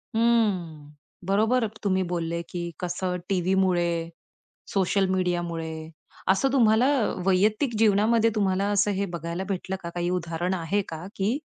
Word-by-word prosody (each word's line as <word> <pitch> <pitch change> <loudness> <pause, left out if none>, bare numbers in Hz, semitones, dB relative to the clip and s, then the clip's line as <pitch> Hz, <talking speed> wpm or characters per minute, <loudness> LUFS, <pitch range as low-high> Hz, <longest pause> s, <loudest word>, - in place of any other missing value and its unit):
हं, 190 -11 +1 0.4
बरोबर 225 +4 +3 0.2
तुम्ही 190 -2 +1
बोलले, 170 -1 -2
की 175 - -4 0.2
कसं 180 +1 -2
टीव्हीमुळे, 185 -1 +2 0.8
सोशल 195 0 +2
मीडियामुळे 175 -3 -1 0.6
असं 260 +8 +2
तुम्हाला 230 -1 +4 0.4
वैयक्तिक 210 +6 +2
जीवनामध्ये 220 +2 +4
तुम्हाला 195 -1 +1
असं 205 0 +2
हे - - +1
बघायला 170 +3 -4
भेटलं 190 0 -3
का, 170 - -4
काही 175 0 -2
उदाहरण 175 +1 -2
आहे 185 +3 0
का, 165 +2 -7
की 210 +8 0
190 Hz, 125 wpm, -26 LUFS, 175-210 Hz, 0.8 s, तुम्हाला